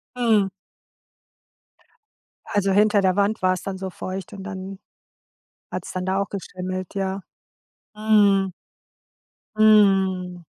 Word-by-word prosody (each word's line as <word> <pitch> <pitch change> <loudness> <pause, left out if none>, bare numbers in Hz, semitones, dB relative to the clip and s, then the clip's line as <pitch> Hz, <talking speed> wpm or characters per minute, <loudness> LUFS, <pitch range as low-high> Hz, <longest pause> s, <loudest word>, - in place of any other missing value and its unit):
Mhm. 225 -5 +3 2.0
Also 200 -1 0
hinter 210 +1 +4
der 185 -1 +2
Wand 205 +2 +1
war 185 0 +3
es 185 - -6
dann 195 -1 -4
so 190 0 -5
feucht 185 +3 -6
und 195 -1 -8
dann 190 -1 -7 0.9
hat's - - -5
dann 185 0 -4
da 190 +1 0
auch 200 - -2
geschimmelt, 185 -1 -6
ja? 195 0 -2 0.7
Mhm. 205 -3 +3 1.1
Mhm. 190 -4 +3
195 Hz, 115 wpm, -23 LUFS, 185-205 Hz, 2.0 s, hinter